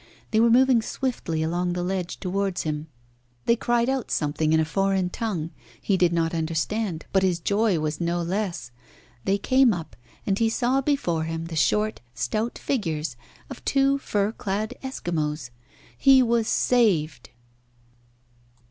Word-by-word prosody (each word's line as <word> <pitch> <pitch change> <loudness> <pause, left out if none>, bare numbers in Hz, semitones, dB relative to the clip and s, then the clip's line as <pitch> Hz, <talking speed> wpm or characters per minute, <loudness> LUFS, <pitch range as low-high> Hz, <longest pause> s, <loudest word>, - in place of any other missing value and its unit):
They 220 - +3
were 235 +1 +5
moving 250 0 +5
swiftly 220 - -2
along 175 +2 -1
the 175 0 -2
ledge 180 -1 -3
towards 195 0 -1
him. 150 0 -3 0.6
They 235 - +4
cried 240 0 +1
out 265 -3 -1
something 155 +1 0
in 160 - +4
a 160 - +2
foreign 190 +1 0
tongue. 175 -9 -3 0.3
He 200 - +1
did 180 -2 +3
not 165 -1 0
understand, 165 +3 -2
but 190 - +4
his 185 -2 +2
joy 200 +1 +1
was 155 0 -2
no 170 +1 0
less. 180 - -3 0.5
They 195 +1 +2
came 260 +2 +4
up, 165 -2 -8 0.3
and 195 -1 0
he 225 -1 +3
saw 250 +4 +1
before 215 - 0
him 165 0 -4
the 165 -1 -6
short, 210 +7 +1
stout 215 - -2
figures 160 - -2 0.3
of 270 - -10
two 275 0 +2
fur 205 -5 0
clad 210 0 -3
Eskimos. 155 - -3 0.4
He 270 -2 +6
was 230 -2 +1
saved. 205 -11 +2
195 Hz, 150 wpm, -25 LUFS, 165-230 Hz, 0.6 s, He